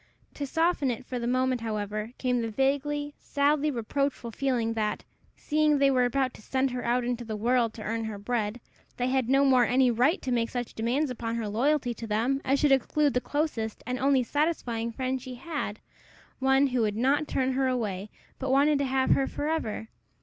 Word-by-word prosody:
To 285 - -4
soften 325 -2 +1
it 250 +1 -4
for 250 -1 -4
the 235 - -2
moment, 255 0 +1
however, 215 0 -3
came 250 -2 0
the 230 - -2
vaguely, 285 +4 0
sadly 290 +1 +1
reproachful 255 0 -2
feeling, 240 -3 0
that, 215 -2 -2 0.3
seeing 305 -1 +2
they 275 0 +4
were 250 -2 +3
about 255 +1 0
to - - -14
send 260 +4 0
her 250 0 -4
out 245 +1 +1
into 240 0 -2
the 220 -2 -5
world 235 +1 +2
to 215 - -7
earn 225 +1 -2
her 220 -2 -5
bread, 215 +1 -2 0.4
they 245 +1 0
had 260 -2 +1
no 275 +1 +4
more 255 -2 +5
any 250 +1 +3
right 255 - +2
to 260 - -2
make 235 -1 +1
such 245 -1 -4
demands 255 +6 0
upon 230 -2 -3
her 230 -2 -2
loyalty 250 +4 +1
to 230 0 -8
them 235 +6 0
as 275 +1 +2
should 295 -2 +3
exclude 285 +2 +2
the 250 - +1
closest 270 -8 -2
and 250 +1 -3
only 270 -1 +3
satisfying 245 -5 -1
friend 260 +2 -2
she 255 -1 -7
had 255 -6 -4 0.6
one 265 +1 +4
who 255 -3 0
would 210 -2 0
not 275 +5 +2
turn 260 0 0
her 265 0 +1
away, 215 -6 -2 0.3
but 265 - -3
wanted 280 +2 +4
to 280 - +1
have 265 0 +1
her 270 - +3
for 295 - -3
ever. 225 -9 -2
255 Hz, 205 wpm, -28 LUFS, 230-275 Hz, 0.6 s, more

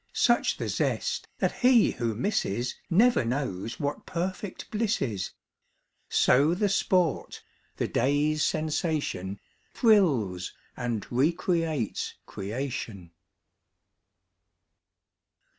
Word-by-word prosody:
Such 240 0 +3
the - - -3
zest - - -1
that - - -1
he 245 -3 +5
who 115 -2 -2
misses 120 - -1 0.2
Never 230 - +4
knows 115 -5 -3
what 145 -1 -3
perfect 185 +2 -4
bliss 225 +1 0
is. 100 -7 -2 0.8
So 145 +7 +4
the 205 +2 +1
sport, 180 -4 +1 0.3
the - - 0
day's 145 +2 +1
sensation, 150 - -1 0.4
Thrills 135 - +3 0.2
and 120 -4 -3
recreates 160 - 0
creation. 105 -4 -5
145 Hz, 90 wpm, -28 LUFS, 115-180 Hz, 0.8 s, he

